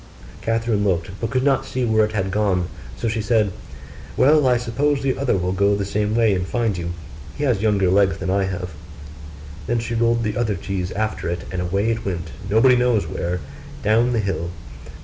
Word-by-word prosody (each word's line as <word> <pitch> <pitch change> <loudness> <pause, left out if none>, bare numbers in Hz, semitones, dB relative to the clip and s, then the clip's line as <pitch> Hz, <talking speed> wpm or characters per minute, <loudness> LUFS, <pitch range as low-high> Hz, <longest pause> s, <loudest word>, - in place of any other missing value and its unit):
Catherine 115 -2 0
looked, 90 -3 0
but 115 - -1
could 130 +1 0
not 135 -2 +2
see 130 -1 -2
where 110 -1 +3
it 105 0 -1
had 95 -3 -1
gone; 95 -4 +1 0.3
so - - -2
she 110 0 -1
said, 110 -2 +2 0.7
'Well, 145 +1 +5
I 125 -1 +4
suppose 135 +5 0
the 135 -2 +1
other 135 -7 +1
will 90 0 -1
go 100 +2 +2
the 100 -1 -2
same 105 +2 -1
way 115 -3 +4
and 90 -1 -1
find 115 -3 0
you; 85 -1 -4 0.4
he 145 - -2
has 120 -8 +1
younger 105 -3 +2
legs 95 0 +3
than 95 -1 -2
I 100 0 +2
have.' 90 -2 -4 0.9
Then 120 - +1
she 115 +1 -3
rolled 115 0 +2
the 105 -1 -1
other 110 -4 0
cheese 95 0 -3
after 110 -4 -2
it; 85 0 -3
and 95 -1 -2
away 100 +5 0
it 115 - -3
went, 90 -4 -4 0.2
nobody 115 +5 +5
knows 125 -6 +2
where, 85 +3 -3 0.4
down 115 +4 +3
the 115 - +1
hill. 95 -4 -2
105 Hz, 205 wpm, -22 LUFS, 95-115 Hz, 0.9 s, Well